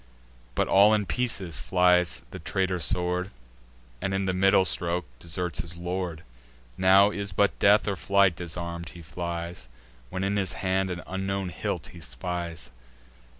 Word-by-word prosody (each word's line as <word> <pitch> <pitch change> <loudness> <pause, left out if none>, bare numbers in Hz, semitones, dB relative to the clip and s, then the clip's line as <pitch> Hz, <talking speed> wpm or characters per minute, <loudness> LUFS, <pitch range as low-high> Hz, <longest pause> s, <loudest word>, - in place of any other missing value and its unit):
But - - +1
all 105 +3 +6
in 105 -1 0
pieces 95 - -2
flies 90 +2 +3
the - - -7
traitor 95 -1 -1
sword, 90 +2 +1 0.7
And, 95 0 -1
in 95 0 0
the 95 - 0
middle 95 +1 +4
stroke, 85 0 0
deserts 85 +2 -3
his 85 0 -7
lord. 90 -1 -4 0.5
Now 95 +2 +6
is 100 -1 -3
but 100 +2 +1
death, 105 +1 +5
or 100 - 0
flight; 100 -1 +3
disarm'd 85 0 -5
he 85 0 -12
flies, 85 -4 -5 0.4
When 95 +1 -3
in 100 +1 0
his 95 -3 0
hand 95 0 0
an 90 0 -5
unknown 95 0 -2
hilt - - -4
he 85 - -11
spies. 85 +6 -5
90 Hz, 150 wpm, -27 LUFS, 85-95 Hz, 0.7 s, all